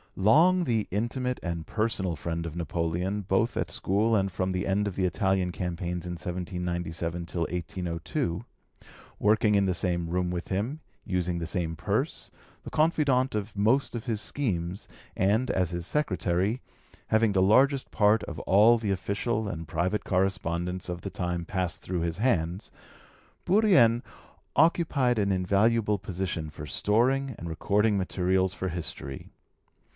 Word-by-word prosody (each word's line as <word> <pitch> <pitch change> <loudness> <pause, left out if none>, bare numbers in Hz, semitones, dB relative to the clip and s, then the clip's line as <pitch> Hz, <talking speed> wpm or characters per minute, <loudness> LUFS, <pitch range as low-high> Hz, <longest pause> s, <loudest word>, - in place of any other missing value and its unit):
Long 165 - +5
the 115 -5 0
intimate 125 +4 -1
and 85 -2 -4
personal 105 -6 -1
friend 85 +3 -4
of 80 - -7
Napoleon 85 +4 -2
both 100 +5 +1
at - - -2
school 105 +4 +1
and 95 -2 +1
from 95 +1 -1
the 90 0 -1
end 100 +1 +1
of 100 - -4
the 95 - +1
Italian 95 0 +1
campaigns 90 -1 -3
in 90 - -4
1797 85 -1 -3
till 85 - -4
1802 85 +1 -3 0.8
working 105 0 +3
in 100 -1 +3
the 90 - 0
same 85 -2 -1
room 90 +1 0
with 90 0 -4
him, 115 +11 -2 0.2
using 90 -2 -1
the 85 - -3
same 80 -1 -2
purse, - - -2 0.3
the - - -7
confidant 145 -6 +2
of 105 +1 -3
most 115 +7 +2
of 115 - -5
his 110 -3 0
schemes, 95 -8 -2 0.3
and, 110 +7 +2
as 90 -3 +1
his 85 -1 -3
secretary, 100 - 0 0.5
having 110 -1 +3
the 95 -1 +2
largest 130 +8 +4
part 105 0 +3
of - - -6
all 110 +5 +5
the 105 -3 -1
official 100 +4 -1
and 80 -4 -5
private 90 +7 -1
correspondence 90 -2 -1
of 90 -1 -4
the 100 - -5
time 90 -2 -3
passed 90 -2 -2
through 90 -2 -3
his 85 0 -2
hands, 95 -4 0 0.8
Bourrienne 180 - +5 0.5
occupied 145 -7 +3
an 100 -1 +1
invaluable 105 +3 +2
position 90 -4 -4
for 75 0 -8
storing 130 - +1
and 85 - -7
recording 100 +5 +1
materials 95 0 +1
for 95 - -3
history. 80 -6 -5
95 Hz, 150 wpm, -28 LUFS, 85-110 Hz, 0.8 s, Long